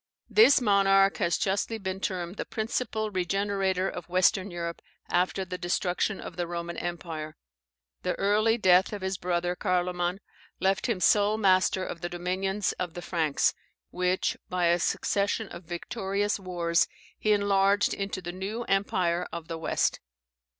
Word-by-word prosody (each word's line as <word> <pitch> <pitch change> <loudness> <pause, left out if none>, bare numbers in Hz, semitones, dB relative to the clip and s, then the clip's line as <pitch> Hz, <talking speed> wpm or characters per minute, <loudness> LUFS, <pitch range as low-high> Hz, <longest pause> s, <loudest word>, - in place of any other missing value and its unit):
This 430 -11 +7
monarch 195 -3 +4
has 170 -2 +1
justly 205 +3 -1
been 190 -2 -4
termed 185 -1 -3
the - - -2
principal 220 -1 -2
regenerator 190 0 0
of 180 -2 -6
Western 185 +2 +3
Europe, 170 -1 -5 0.3
after 185 +2 +1
the 180 0 -6
destruction 180 +3 0
of 175 - -8
the 175 -1 -2
Roman 170 0 -4
empire. 165 -3 -5 0.6
The - - -1
early 215 +3 +2
death 185 -1 +4
of 205 -2 -5
his 190 0 -2
brother, 175 0 -1
Carloman, 180 -1 0 0.4
left 195 +5 +1
him 205 -6 -1
sole 210 +2 +4
master 190 -2 +3
of 170 - -6
the 175 - -3
dominions 185 +3 -1
of 175 -3 -3
the 175 - -6
Franks, 160 -5 +1 0.4
which, 180 +1 0
by 180 -1 0
a 175 +1 +3
succession 200 +5 0
of 175 - -10
victorious 200 +4 -2
wars, 175 -2 +1 0.3
he 215 - +1
enlarged 200 0 +3
into 195 -2 -4
the 175 - -4
new 195 +6 -4
Empire 180 -4 0
of 170 -1 -7
the 165 - -3
West. 160 - 0
185 Hz, 150 wpm, -28 LUFS, 175-200 Hz, 0.6 s, This